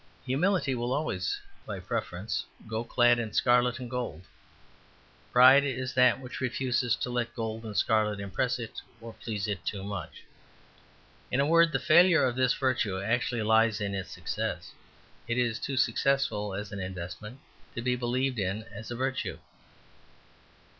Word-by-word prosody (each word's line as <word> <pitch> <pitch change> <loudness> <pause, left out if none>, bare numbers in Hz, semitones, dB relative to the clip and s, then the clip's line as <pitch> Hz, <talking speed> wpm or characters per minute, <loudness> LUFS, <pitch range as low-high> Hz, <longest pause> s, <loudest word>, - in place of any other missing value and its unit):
Humility 145 +2 +1
will 120 0 -1
always, 160 - -1 0.2
by 100 -3 -6
preference, 105 -1 -3 0.2
go 110 +1 -2
clad 120 0 +3
in 110 -3 -4
scarlet 125 0 +3
and 125 -1 -6
gold; 120 -9 -4 1.1
pride 130 +3 +8
is 130 -1 -3
that 125 -1 +4
which 130 -1 -8
refuses 125 -1 0
to 125 - -4
let 120 -1 -2
gold 115 -1 -4
and 105 -2 -5
scarlet 105 -2 +2
impress 100 +6 -1
it 115 -2 -7 0.2
or 115 0 -9
please 105 -3 -4
it 100 -4 -3
too 100 -2 -3
much. 100 -4 -6 1.1
In 125 - 0
a 140 - +4
word, 165 +2 +5
the - - +1
failure 170 -1 +5
of 125 -2 0
this 130 -1 +2
virtue 120 -8 0
actually 115 +2 0
lies 110 0 +3
in 100 -1 -2
its 95 -1 -4
success; - - -4 0.6
it 120 +1 -1
is 120 -2 +1
too 135 -1 -3
successful 120 -5 +1
as 100 +1 -5
an 100 - -5
investment 95 +6 -7 0.4
to 115 - -4
be 125 0 +1
believed 125 +1 -1
in 100 +3 -2
as 110 +2 -8
a 120 - -4
virtue. 130 +2 -2
120 Hz, 160 wpm, -29 LUFS, 105-130 Hz, 1.1 s, pride